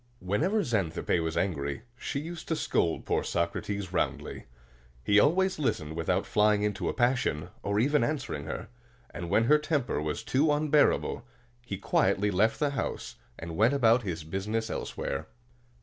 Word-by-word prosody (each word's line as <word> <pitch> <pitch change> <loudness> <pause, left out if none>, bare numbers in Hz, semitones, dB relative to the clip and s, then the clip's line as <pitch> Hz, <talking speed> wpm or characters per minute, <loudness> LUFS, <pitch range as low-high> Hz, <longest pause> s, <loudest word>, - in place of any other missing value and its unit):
Whenever 160 - +1
Xanthippe 100 - 0
was 80 -1 -2
angry, 70 -2 -1
she 140 - -3
used 165 +2 -7
to 160 - 0
scold 145 - 0
poor - - 0
Socrates 95 +3 -2
roundly. 85 - -2 0.6
He 100 +10 +5
always 185 - +3
listened 90 - -1
without 90 +4 0
flying 105 0 +3
into 105 -1 -1
a - - -1
passion, 120 - +1
or 100 +1 0
even 145 +2 +3
answering 120 - -2
her; - - -5 0.4
and 85 0 -6
when 105 +4 +3
her 150 +6 +5
temper 145 - -1
was 75 +1 -3
too 145 +4 +2
unbearable, 150 0 +2 0.4
he 100 -5 -5
quietly 100 +1 +2
left 105 +4 +2
the 145 -2 +1
house, 140 - -4 0.2
and 80 0 -6
went 115 +9 +4
about 120 -2 +4
his 85 -7 -4
business 105 +7 -2
elsewhere. - - -4
105 Hz, 155 wpm, -29 LUFS, 90-140 Hz, 0.6 s, He